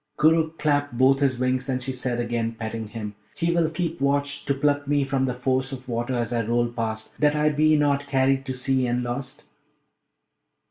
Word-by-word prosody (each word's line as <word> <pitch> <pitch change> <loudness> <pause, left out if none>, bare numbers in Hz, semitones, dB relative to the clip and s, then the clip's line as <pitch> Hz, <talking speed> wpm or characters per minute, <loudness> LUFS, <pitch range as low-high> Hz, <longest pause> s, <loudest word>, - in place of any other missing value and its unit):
Koorookh 160 +1 +3
clapped 145 -4 0
both 135 +2 +4
his 135 -3 +1
wings, 130 +1 0
and 130 -1 -1
she 135 - -2
said 125 -1 -2
again, 115 -1 -1
petting 110 -1 -5
him, 105 -1 -6 0.2
'He 170 +1 0
will 170 -2 +2
keep 165 -1 -3
watch 140 +1 0
to 140 - +1
pluck 145 0 +1
me 145 0 +2
from 135 -1 0
the 125 - -1
force 130 +1 0
of 130 -1 -8
water 120 +1 -2
as 120 0 -1
I 115 -1 +1
roll 120 +2 +1
past, 110 -2 -4
that 150 0 +3
I 150 0 +3
be 155 +1 +3
not 145 -1 +1
carried 135 0 +2
to - - -2
the - - -7
sea, 130 0 +1
and 120 +1 0
lost?' 120 +3 -5
130 Hz, 205 wpm, -24 LUFS, 120-145 Hz, 0.2 s, both